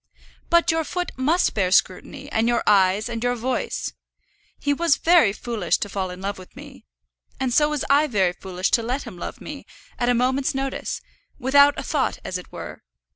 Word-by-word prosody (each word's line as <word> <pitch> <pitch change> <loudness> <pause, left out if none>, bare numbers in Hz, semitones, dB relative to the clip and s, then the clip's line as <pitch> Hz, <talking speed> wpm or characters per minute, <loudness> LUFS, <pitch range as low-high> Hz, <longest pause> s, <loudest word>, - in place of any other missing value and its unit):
"But 340 0 +4
your 325 0 0
foot 355 +3 -3
must 305 +8 +1
bear 190 -4 +1
scrutiny, 265 +9 0
and 225 +1 +1
your 240 0 +1
eyes, 200 +1 +3
and 230 -1 -4
your 245 0 +1
voice. 250 +2 -3 0.6
He 285 - 0
was 330 -1 +2
very 330 - +5
foolish 215 -4 -1
to 205 - -4
fall 190 -1 -3
in 180 0 -8
love 200 0 -4
with 185 - -14
me. - - -12 0.5
And 255 -2 -1
so 295 +3 +4
was 300 -2 -2
I 290 +2 +4
very 190 -8 +1
foolish 185 0 -3
to 235 - +3
let 250 +5 -2
him 215 -8 -10
love - - -6
me, - - -8 0.4
at 240 - +1
a 245 - +3
moment's 260 +4 +1
notice, 270 0 -3 0.4
without 280 +3 +5
a 275 - -4
thought 275 -1 -1
as 185 - -3
it 180 - -14
were. - - -8
245 Hz, 195 wpm, -23 LUFS, 200-285 Hz, 0.6 s, very